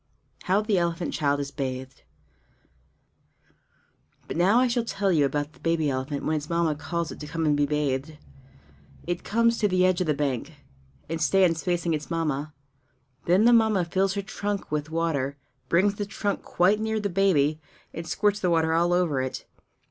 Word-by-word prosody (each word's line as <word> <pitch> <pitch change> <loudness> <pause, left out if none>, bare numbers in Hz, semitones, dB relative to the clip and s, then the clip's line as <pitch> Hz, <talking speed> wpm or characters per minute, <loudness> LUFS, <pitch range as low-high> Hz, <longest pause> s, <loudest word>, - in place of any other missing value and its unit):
How 190 +3 +3
the 210 -3 +1
Elephant 170 0 -2
Child 145 -2 +1
is 140 0 -5
Bathed 130 -1 -5 2.3
But - - -5
now 190 +8 +4
I 255 - +4
shall 240 -1 0
tell 200 -3 -1
you 150 -5 +3
about 145 +2 -2
the - - -21
baby 165 -3 0
elephant 135 +2 -3
when 155 - +1
its 150 0 -6
Mamma 170 -2 +1
calls 170 +2 -4
it - - -9
to 150 - -7
come 165 +1 -2
and 150 -1 +3
be 145 0 +1
bathed. 150 0 -2 0.9
It 175 0 -3
comes 230 +2 +2
to 210 - +3
the 185 -1 +2
edge 185 0 +2
of 180 - 0
the 150 - +2
bank, 140 -4 -2 0.5
and 165 0 -4
stands 170 -1 +3
facing 175 -2 0
its 150 -1 -4
Mamma. 155 -3 -2 0.8
Then 185 +6 +4
the 240 - +6
Mamma 220 -6 +3
fills 190 +3 0
her 200 - -2
trunk 200 -2 -4
with 150 0 -2
water, 155 -4 -1 0.3
brings 195 +4 +3
the 205 0 -4
trunk 205 -1 -2
quite 190 +4 +2
near 220 0 -1
the 205 - -1
baby, 160 -6 +2 0.3
and 165 0 -6
squirts 205 +4 +1
the 180 - 0
water 160 -1 +2
all 170 +1 +2
over 170 -7 +1
it. 130 0 -5
170 Hz, 185 wpm, -26 LUFS, 150-195 Hz, 2.3 s, the